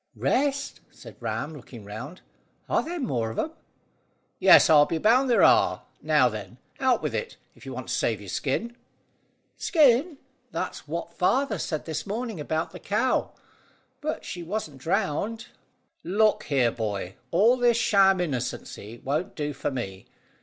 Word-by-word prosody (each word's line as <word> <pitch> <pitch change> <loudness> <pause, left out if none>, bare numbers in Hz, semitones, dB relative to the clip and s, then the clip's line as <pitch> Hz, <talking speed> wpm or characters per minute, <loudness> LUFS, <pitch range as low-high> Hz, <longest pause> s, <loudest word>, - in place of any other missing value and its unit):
"Rest?" 280 +1 0
said - - -13
Ram, 160 - -3
looking 120 -6 -11
round. 120 - -8 0.5
"Are - - +2
there 345 - -5
any 300 -7 -2
more 115 - -1
of 110 - -8
'em?" 315 - -1 0.9
"Yes, - - +8
I'll 150 -3 +6
be 165 - -1
bound 245 +8 +3
there 240 - +4
are. - - +4 0.2
Now, 150 -4 +4
then, 105 -1 -6 0.2
out 260 -2 +2
with - - -2
it, 475 - -4 0.2
if - - -15
you - - -5
want - - -7
to - - -1
save - - 0
your - - -11
skin." 235 +1 -2 0.8
"Skin? 310 - +3 0.3
That's - - -5
what - - -5
father 265 -8 +1
said 155 0 -3
this 155 0 -4
morning 220 -2 -4
about 160 +2 -2
the 180 - -10
cow; 225 +6 0 0.7
but 305 +1 -3
she 175 - -6
wasn't 165 -6 -5
drowned." 180 - -1 0.5
"Look 210 +4 +2
here, 130 -5 +2
boy. 100 -5 -4 0.2
All 215 - +4
this 240 -2 +3
sham 195 -4 +4
innocency 125 - -4
won't 150 +6 -2
do 150 -1 -3
for 140 - -3
me. 95 -8 -6
175 Hz, 160 wpm, -26 LUFS, -, 0.9 s, Yes